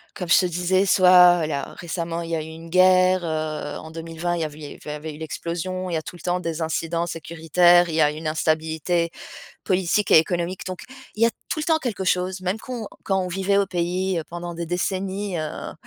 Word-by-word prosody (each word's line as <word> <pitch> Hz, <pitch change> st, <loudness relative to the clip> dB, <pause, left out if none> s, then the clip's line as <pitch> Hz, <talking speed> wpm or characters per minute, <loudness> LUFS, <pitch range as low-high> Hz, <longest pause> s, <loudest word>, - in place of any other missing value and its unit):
comme 180 Hz, -4 st, -5 dB
je -, -, +7 dB
te 185 Hz, -, +2 dB
disais, 180 Hz, +2 st, +1 dB
soit, 180 Hz, -3 st, +6 dB
là, 140 Hz, -3 st, -4 dB
récemment, 170 Hz, -1 st, -3 dB
il 165 Hz, 0 st, -6 dB
y -, -, +1 dB
a 160 Hz, -, -2 dB
eu -, -, -7 dB
une 165 Hz, +1 st, -10 dB
guerre, 185 Hz, 0 st, +4 dB
heu, 155 Hz, -2 st, -3 dB
en 160 Hz, -, -10 dB
2020, 165 Hz, +1 st, -3 dB
il 170 Hz, -, -3 dB
y -, -, +1 dB
a -, -, -1 dB
vu 150 Hz, 0 st, -13 dB
il -, -, -10 dB
y 145 Hz, -, -7 dB
eu -, -, -8 dB
avait 150 Hz, +1 st, -6 dB
eu -, -, -11 dB
l'explosion, 175 Hz, +3 st, -4 dB
il -, -, -4 dB
y -, -, +1 dB
a -, -, -2 dB
tout 180 Hz, +2 st, -9 dB
le 170 Hz, -, -13 dB
temps 180 Hz, 0 st, 0 dB
des 165 Hz, -1 st, -4 dB
incidents 165 Hz, +1 st, -1 dB
sécuritaires, 170 Hz, +2 st, +3 dB
il 160 Hz, -, -3 dB
y 160 Hz, -, +3 dB
a 150 Hz, 0 st, +4 dB
une 155 Hz, +1 st, -6 dB
instabilité 160 Hz, +2 st, 0 dB, 0.5 s
politique 190 Hz, +2 st, +1 dB
et -, -, +9 dB
économique. 175 Hz, +3 st, 0 dB
Donc 185 Hz, -1 st, -6 dB, 0.3 s
il 225 Hz, -, +1 dB
y -, -, +8 dB
a -, -, +4 dB, 0.2 s
tout 310 Hz, -, -2 dB
le 305 Hz, -, -2 dB
temps 320 Hz, -1 st, +3 dB
quelque 225 Hz, -9 st, -3 dB
chose, 185 Hz, +1 st, 0 dB
même 185 Hz, +4 st, -2 dB
qu'on 240 Hz, -4 st, -6 dB, 0.2 s
quand 190 Hz, -1 st, +1 dB
on 180 Hz, -, -3 dB
vivait 195 Hz, +2 st, 0 dB
au 200 Hz, -, +3 dB
pays, 180 Hz, 0 st, -1 dB
heu, -, -, -5 dB
pendant 175 Hz, 0 st, -6 dB
des 170 Hz, 0 st, -4 dB
décennies, 190 Hz, +2 st, -2 dB
heu, 155 Hz, -1 st, -5 dB
175 Hz, 240 wpm, -23 LUFS, 160-185 Hz, 0.5 s, et